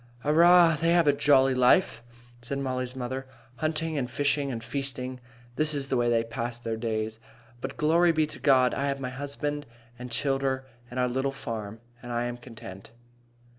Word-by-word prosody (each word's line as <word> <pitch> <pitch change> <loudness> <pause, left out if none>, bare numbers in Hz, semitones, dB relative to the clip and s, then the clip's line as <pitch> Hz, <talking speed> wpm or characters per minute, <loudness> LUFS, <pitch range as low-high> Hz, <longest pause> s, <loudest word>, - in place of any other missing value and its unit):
"Arrah! 170 +1 +6
they 165 +1 +3
have 170 -1 +4
a 145 - +5
jolly 135 -2 +4
life," 125 0 +3 0.4
said 120 +4 -4
Mollie's 130 -2 -3
mother. 130 +1 -4 0.3
"Hunting 155 -1 -1
and 125 -2 -3
fishing 140 +1 0
and 115 -2 -5
feasting. 130 -1 -3 0.4
That 155 0 +2
is 140 -1 -4
the - - +1
way 120 -1 +2
they 115 -1 +2
pass 115 +1 -4
their 115 -2 -4
days. 110 -1 -3 0.4
But, - - -6
glory 170 +3 +4
be 155 -1 +2
to 150 -2 -10
God, 130 -3 +4
I 140 +1 -1
have 140 0 -2
my 130 -1 -4
husband 145 +2 -4 0.3
and 125 0 -7
childer 135 +1 -1 0.2
and 125 - -5
our 125 - +2
little 130 +2 -1
farm, 110 -4 -6 0.2
and 120 - -8
I 120 0 0
am 120 0 -4
content." 115 -6 -11
130 Hz, 180 wpm, -27 LUFS, 120-145 Hz, 0.4 s, Arrah